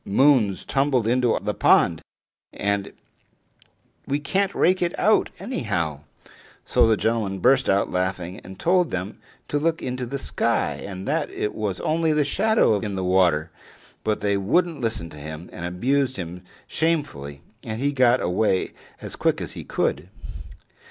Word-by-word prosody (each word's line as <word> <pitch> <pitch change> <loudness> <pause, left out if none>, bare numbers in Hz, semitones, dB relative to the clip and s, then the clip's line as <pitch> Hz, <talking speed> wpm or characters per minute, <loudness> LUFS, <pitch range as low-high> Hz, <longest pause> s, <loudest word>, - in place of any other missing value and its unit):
Moon's 115 -3 +3
tumbled 135 -4 +1
into 125 0 +2
the 105 +1 -1
pond, - - +3 0.5
and 100 -1 -2 1.2
we 140 +1 0
can't 190 +7 0
rake 185 +1 +3
her 175 - +1
out 215 +3 +3
anyhow!" 85 - -2 0.7
So - - +4
the 110 -1 +3
gentleman 110 -4 0
burst 130 +6 +3
out 100 +1 +2
laughing, 90 0 -2
and 95 0 -12
told 180 0 +3
them 95 +3 -4 0.3
to 145 - 0
look 165 +2 +1
up - - -13
into 125 -1 -3
the 140 +3 -3
sky, - - -1
and 95 -1 -7
that 155 +1 0
it 105 - -3
was 100 -4 -3
only 160 0 +1
the 150 -1 +3
shadow 215 - +3
in 105 -2 -4
the 95 - -2
water. 90 -4 +2 0.5
But 105 -1 -1
they 100 -1 +1
wouldn't 160 - +1
listen 110 -8 -3
to - - -11
him, 80 +3 -8
and 85 - -6
abused 130 +8 0
him 90 0 -6 0.2
shamefully 75 - -2 0.2
and 110 -1 -5
he 140 +2 +1
got 125 -2 +3
away 95 +1 +1 0.3
as - - -6
quick - - +1
as - - -5
he - - -7
could. 75 +6 -1
110 Hz, 160 wpm, -24 LUFS, 95-140 Hz, 1.2 s, So